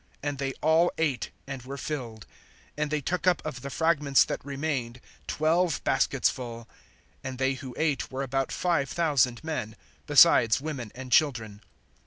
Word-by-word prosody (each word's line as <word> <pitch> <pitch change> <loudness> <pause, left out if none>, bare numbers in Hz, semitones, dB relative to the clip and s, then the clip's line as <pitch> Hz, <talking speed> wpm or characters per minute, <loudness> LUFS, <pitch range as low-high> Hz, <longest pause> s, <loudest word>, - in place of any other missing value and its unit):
(20)And 145 -2 -3
they 135 -1 -2
all 160 +3 +4
ate, 145 -7 -1 0.2
and 135 -2 -6
were 135 +3 -7
filled; 120 -8 -5 0.5
and 150 +1 -1
they 150 0 -1
took 180 +5 -2
up 180 - +4
of 130 -5 -5
the 140 - -6
fragments 150 -3 +3
that - - -5
remained 135 -4 -3 0.3
twelve 165 +2 +1
baskets 135 0 +2
full. 115 -3 -5 0.6
(21)And 130 -1 -5
they 130 +1 +1
who 130 -2 -8
ate 155 -4 0
were 135 +1 -3
about 135 0 -1
five 165 -7 0
thousand 140 -7 +1
men, 150 -9 -4 0.3
besides 115 +1 +6
women 135 -7 -5
and 130 0 -8
children. 115 -8 +2
135 Hz, 160 wpm, -27 LUFS, 125-155 Hz, 0.6 s, besides